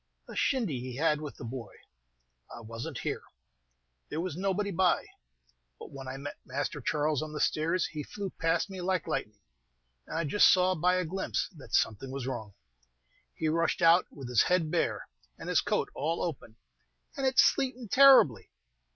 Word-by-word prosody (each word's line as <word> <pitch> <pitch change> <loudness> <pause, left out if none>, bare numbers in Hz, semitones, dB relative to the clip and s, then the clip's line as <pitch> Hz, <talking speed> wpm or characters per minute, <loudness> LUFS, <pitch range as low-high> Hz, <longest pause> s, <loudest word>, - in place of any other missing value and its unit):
"A - - -9
shindy 220 - 0
he 125 0 -6
had 150 +1 +1
with 150 -2 -7
the - - -9
boy. 115 -1 -7 0.8
I - - -9
was 115 +1 -7
n't - - -6
here; - - -3 0.9
there 155 - -3
was 175 -2 -3
nobody 195 +2 -1
by. 180 0 +2 0.7
But - - -11
when 135 -2 -9
I 130 +1 -5
met 140 +1 -7
Master 140 +2 -4
Charles 150 +2 0
on 155 -1 -6
the 150 - -4
stairs, 165 +4 +1
he 155 - -5
flew 195 +5 -6
past 165 +4 +1
me 190 -2 -7
like 180 -1 0
lightning, 105 -9 -4 0.7
and - - -4
I 165 - 0
just 185 +7 +5
saw 185 0 +3
by 180 +2 +2
a 185 -1 0
glimpse 190 +4 -2
that 130 -7 -4
something 115 +4 0
was 135 -1 -5
wrong. 110 -6 -5 0.8
He 160 - -2
rushed 165 +1 +1
out 170 +2 +6
with 135 -4 -9
his 125 -2 +4
head 175 -4 +1
bare, - - -1 0.3
and - - -7
his - - +3
coat - - -1
all 160 +4 -2
open, 135 -9 -5 0.6
and 275 -3 0
it 260 - -1
sleetin' 255 -3 +3
terribly! 255 - +6
155 Hz, 180 wpm, -30 LUFS, 135-185 Hz, 0.9 s, out